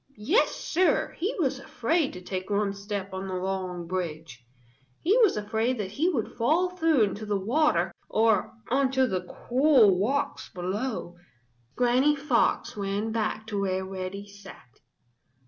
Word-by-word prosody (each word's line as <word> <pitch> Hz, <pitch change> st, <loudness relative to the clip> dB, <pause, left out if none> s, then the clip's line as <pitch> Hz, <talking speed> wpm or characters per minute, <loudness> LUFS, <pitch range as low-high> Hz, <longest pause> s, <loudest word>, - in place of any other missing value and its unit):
Yes, 305 Hz, -, +2 dB
Sir, 365 Hz, +2 st, +1 dB
he 385 Hz, +8 st, -1 dB
was 270 Hz, -6 st, 0 dB
afraid 275 Hz, +4 st, 0 dB
to 180 Hz, -, -8 dB
take 185 Hz, +1 st, -5 dB
one 205 Hz, -1 st, +1 dB
step 200 Hz, -1 st, -5 dB
on 190 Hz, +1 st, -4 dB
the 185 Hz, -, -3 dB
long 185 Hz, -2 st, -3 dB
bridge. 165 Hz, -7 st, -5 dB, 0.6 s
He 380 Hz, +6 st, +2 dB
was 435 Hz, -, +4 dB
afraid 220 Hz, +4 st, -1 dB
that 195 Hz, -3 st, -4 dB
he 310 Hz, -, +1 dB
would 255 Hz, -, -2 dB
fall 320 Hz, +10 st, +2 dB
through 325 Hz, -8 st, +3 dB
into 205 Hz, +1 st, -2 dB
the 205 Hz, -1 st, 0 dB
water 195 Hz, -, +1 dB, 0.2 s
or 220 Hz, -2 st, +2 dB, 0.2 s
onto 265 Hz, 0 st, +2 dB
the 185 Hz, -7 st, -1 dB
cruel 235 Hz, -1 st, +3 dB
rocks 280 Hz, +6 st, -1 dB
below. 185 Hz, 0 st, -4 dB, 0.6 s
Granny 255 Hz, +4 st, +3 dB
Fox 290 Hz, +2 st, +1 dB
ran 205 Hz, +2 st, -2 dB
back 220 Hz, -1 st, -2 dB
to 205 Hz, -2 st, -3 dB
where 190 Hz, -1 st, -1 dB
Reddy 190 Hz, +1 st, -6 dB
sat. 200 Hz, -, -14 dB
210 Hz, 145 wpm, -27 LUFS, 190-265 Hz, 0.6 s, was